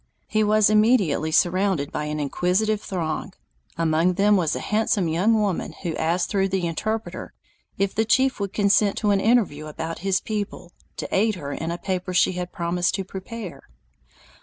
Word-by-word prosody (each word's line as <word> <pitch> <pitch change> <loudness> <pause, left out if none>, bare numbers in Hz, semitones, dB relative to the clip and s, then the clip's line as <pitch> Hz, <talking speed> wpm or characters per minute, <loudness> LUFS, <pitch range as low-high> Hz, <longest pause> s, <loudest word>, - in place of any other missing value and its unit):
He 215 0 +1
was 215 0 +4
immediately 210 - +3
surrounded 180 -3 +1
by 150 - -3
an 150 0 -3
inquisitive 185 +8 0
throng. 165 -5 -4 0.4
Among 165 +2 +2
them 205 +3 +3
was 170 -6 +1
a - - -3
handsome 210 -3 0
young 195 +8 +2
woman 200 -5 -2
who 165 -3 -2
asked 170 +2 0
through 195 -2 +2
the 190 -2 -1
interpreter 215 +7 -4 0.4
if 195 -1 0
the 220 - +1
chief 260 +3 +2
would 200 -1 -2
consent 200 0 +2
to 210 -2 +1
an 200 - +3
interview 195 -10 +1
about 160 +2 -5
his 190 0 +1
people, 205 -5 -5 0.3
to - - -4
aid 215 +2 +2
her 145 -5 -6
in 165 +3 -4
a 170 - -3
paper 185 0 -3
she - - +4
had 180 0 -5
promised 175 +1 0
to 195 - -2
prepare. 190 -4 -8
190 Hz, 175 wpm, -23 LUFS, 170-210 Hz, 0.4 s, was